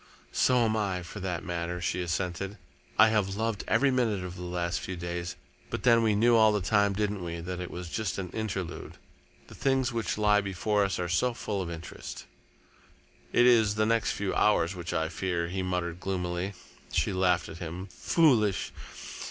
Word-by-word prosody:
"So 125 -2 +3
am 110 -1 +1
I, 95 -4 -1
for 95 +4 -8
that 90 -3 -3
matter," 85 0 -3
she 90 +1 -1
assented. 90 +3 -2 0.4
"I 110 +1 +8
have 100 -3 +1
loved 110 -1 -1
every 135 +5 +3
minute 115 -7 +1
of 90 0 -6
the 90 - -8
last 90 0 -2
few 95 - -5
days, 85 0 -4 0.3
but - - -4
then 115 -2 +6
we 110 -2 +3
knew 120 +3 +5
all 110 -1 +6
the 105 - +1
time, 100 +1 +2
didn't 105 -1 -1
we, 85 -1 -4
that 90 +2 -5
it 90 - -4
was 90 0 -6
just 105 +3 -2
an 90 -2 -4
interlude? 95 -5 -4 0.5
The - - -14
things 135 -2 +1
which 115 -2 -1
lie 105 -1 +4
before 100 +2 0
us 95 -2 0
are 90 - -2
so 115 +8 +1
full 100 -4 -3
of 90 - -4
interest." 85 0 -8 1.1
"It 120 - +5
is 110 -4 +5
the 110 0 +2
next 115 0 +2
few 100 -2 -2
hours 95 -4 +3
which 85 -1 -5
I 80 -2 0
fear," 85 -1 -2
he 95 +1 -2
muttered 90 -2 -2
gloomily. 90 0 -2 0.4
She 100 - +1
laughed 90 -3 +2
at 80 - -9
him. 90 +2 -6
"Foolish! 120 - +2
95 Hz, 190 wpm, -29 LUFS, 90-110 Hz, 1.1 s, I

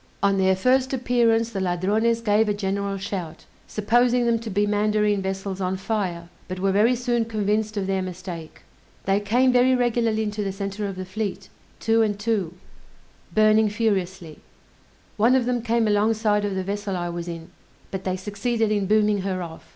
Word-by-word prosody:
On 200 -1 +3
their 190 0 +3
first 255 +6 +2
appearance 235 -3 +2
the 195 -3 -3
Ladrones 205 +6 +1
gave 215 -1 +2
a 205 - 0
general 200 0 -2
shout, 190 -4 -6 0.2
supposing 240 +3 +2
them 230 -1 +2
to 225 0 -6
be 205 +1 +1
mandarine 210 0 +1
vessels 195 0 -4
on 185 0 -1
fire, 185 -4 -3 0.2
but 185 0 -5
were 195 +1 +1
very 215 +6 +3
soon 240 -1 0
convinced 215 -1 -1
of 195 - -1
their 190 0 0
mistake. 180 -3 -7 0.4
They 195 +1 +2
came 245 +6 +2
very 250 +1 +4
regularly 230 -3 +1
into 210 0 -3
the 195 - -2
center 200 +1 -4
of 195 - -5
the 185 0 -6
fleet, 200 +1 -4 0.3
two 225 0 +2
and 210 -2 +1
two, 205 -6 -1 0.8
burning 215 0 +4
furiously; 190 -7 -2 0.8
one 230 +5 +4
of 255 -2 +2
them 245 -1 0
came 230 -1 +1
alongside 210 0 +2
of 200 -2 -2
the 190 - -1
vessel 200 0 -3
I 175 0 -3
was 170 0 -5
in, 165 -1 -7 0.4
but 190 -1 -4
they 185 0 -1
succeeded 215 +3 -1
in 205 -2 0
booming 210 -1 +3
her 185 -1 -2
off. 160 -1 -10
205 Hz, 180 wpm, -24 LUFS, 190-225 Hz, 0.8 s, very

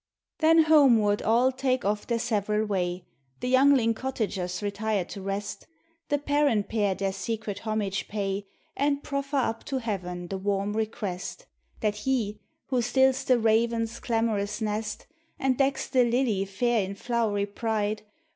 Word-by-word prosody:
Then 325 0 +6
homeward 245 -10 +5
all 240 +4 +3
take 255 -2 -1
off 205 +1 -1
their 235 - +1
several 215 -2 0
way; 180 -3 -2 0.3
The 250 - -2
youngling 260 -3 +5
cottagers 210 -7 -3
retire 205 -1 -1
to 200 - -8
rest: 195 +1 -4 0.4
The 290 - +2
parent 285 -7 +1
pair 205 -4 +1
their 195 0 -1
secret 210 0 -4
homage 200 -3 -1
pay, 200 -1 -3 0.3
And 285 0 0
proffer 280 0 -2
up 230 -4 0
to 270 - -2
Heaven 180 -7 -4
the 195 - -3
warm 200 +1 -1
request. 215 - -4 0.4
That 210 -1 0
He 215 -3 -1 0.3
who 255 -2 +2
stills 265 +2 +3
the 255 - +4
raven's 230 +1 +1
clamorous 220 -3 -1
nest, 215 -1 -3 0.3
And 265 -2 +1
decks 270 +1 +1
the 255 -1 +3
lily 235 -5 +1
fair 230 +4 +1
in 195 +1 -5
flowery 215 -2 0
pride. 210 0 -2
220 Hz, 145 wpm, -27 LUFS, 200-255 Hz, 0.4 s, Then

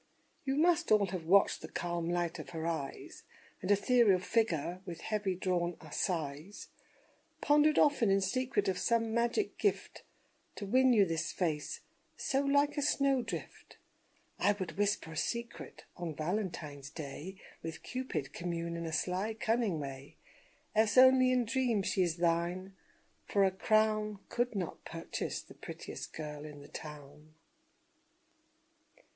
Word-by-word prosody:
You 270 0 0
must 335 0 +3
all 210 -2 +6
have 175 -3 -4
watched 195 +3 +4
the - - -7
calm 170 -1 -3
light 175 -1 -1
of - - -8
her 160 -2 -5
eyes, 160 -5 -4 0.4
And 185 - -4
ethereal 205 0 +5
figure 180 -4 0
with 170 -3 -7
heavy 210 -4 -1
drawn 175 -1 -1
sighs; 160 +1 -3 0.7
Pondered 300 +1 +4
often 280 -7 +4
in 195 0 +4
secret 255 +7 0
of 185 -1 0
some 230 +1 +1
magic 235 - 0
gift 410 - -1 0.5
To 205 - -5
win 255 +5 +4
you 210 -5 +6
this 165 -3 -2
face 155 -5 -2 0.4
so 270 - +1
like 285 +1 +2
a - - +1
snowdrift 275 -3 -1 0.6
I 205 - +4
would 190 -3 -5
whisper 205 -5 0
a - - -8
secret: 235 +6 -4
On 170 -3 -4
Valentine's 155 -5 -3
day, 155 +4 -7 0.3
With 165 0 -7
Cupid 255 - -4
commune 170 -1 -3
in 170 0 -4
a 160 - -5
sly, 185 +7 -1
cunning 220 -6 0
way, 135 -1 -8 0.6
Else 220 +1 +3
only 255 0 +7
in 250 -1 +2
dreams 230 -4 +1
she 185 0 +1
is 170 -2 +1
thine; 175 +3 0 0.5
for 200 - +3
a 190 - +4
crown 215 +1 +2
Could 240 -1 -1
not 180 -4 -4
purchase 165 0 -4
the - - -14
prettiest - - -8
girl 150 -2 -6
in 150 -1 -9
the 145 - -12
town. 150 0 -10
190 Hz, 145 wpm, -33 LUFS, 165-235 Hz, 0.7 s, only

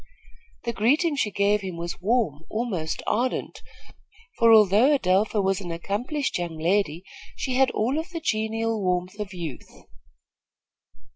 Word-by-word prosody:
The 235 - -2
greeting 290 - +2
she 250 -7 0
gave 205 +1 +1
him 185 -3 -6
was 170 +1 -5
warm, 205 - +1
almost 200 -9 -3
ardent, 250 +4 -1 0.8
for, 230 -1 +6
although 220 +6 +6
Adelpha 205 -1 +1
was 195 0 0
an 175 - -6
accomplished 210 - -2
young 170 -2 -4
lady, 170 0 0 0.3
she 260 - -3
had 260 0 +4
all 250 +8 0
of 325 +3 -6
the 340 -2 -5
genial 225 -4 -1
warmth 180 +2 -1
of 210 -2 -4
youth. 170 -8 -8
210 Hz, 140 wpm, -25 LUFS, 180-240 Hz, 0.8 s, for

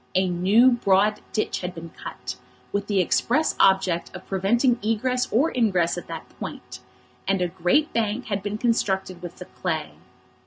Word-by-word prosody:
A 185 0 +3
new 195 +8 +4
broad 210 -2 +2
ditch 215 - -1
had 180 0 -5
been 165 0 -8
cut, - - -7 0.4
with 200 0 -2
the 200 -2 +1
express 250 - +2
object 190 -3 +3
of 185 - -9
preventing 235 +6 +2
egress 250 +4 0
or 275 +9 +3
ingress 185 -8 +2
at 175 - -7
that - - -7
point; - - -7 0.5
and 195 0 +2
a 180 - +1
great 180 - +1
bank 225 +2 -1
had 200 -2 -2
been 205 +1 -3
constructed 190 -6 0
with 175 -1 -8
the 180 - -9
clay. 160 -5 -3
195 Hz, 165 wpm, -24 LUFS, 180-230 Hz, 0.5 s, new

